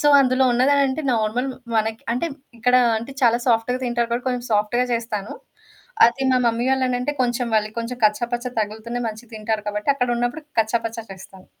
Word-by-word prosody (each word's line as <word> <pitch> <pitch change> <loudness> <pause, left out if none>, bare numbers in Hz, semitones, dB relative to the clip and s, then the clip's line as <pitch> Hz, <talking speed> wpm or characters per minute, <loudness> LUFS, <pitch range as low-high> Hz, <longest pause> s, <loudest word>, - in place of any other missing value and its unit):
So, 295 - +3
అందులో 260 0 +3
ఉన్నదంటే 275 +3 +2
normal 225 +4 0 0.3
మనకి 220 0 -1
అంటే, 250 +8 -1 0.3
ఇక్కడ 250 +2 +2 0.2
అంటే 235 +5 -8
చాలా 235 -1 +4
సాఫ్ట్‌గా 240 +1 +2
తింటారు 240 -1 0
కాబట్టి 240 +2 -2
కొంచెం 250 -1 -2
సాఫ్ట్‌గా 215 +4 +2
జేస్తాను. 225 -3 -3 0.7
అది 240 +3 -1
మా - - +4
మమ్మీ 235 +1 +1
వాళ్ళనంటే 255 +1 0
కొంచెం 245 0 0
మళ్ళీ 215 0 +1
కొంచెం 230 +2 -4
కచ్చాపచ్చ 240 +3 0
తగులుతూనే 220 +3 -4
మంచిగా 220 +2 -10
తింటారు 215 0 -2
కాబట్టి 210 +3 -4
అక్కడున్నప్పుడు 245 +2 -1 0.2
కచ్చాపచ్చా 230 +1 -2
చేస్తాను. 190 0 -14
235 Hz, 155 wpm, -22 LUFS, 220-250 Hz, 0.7 s, చాలా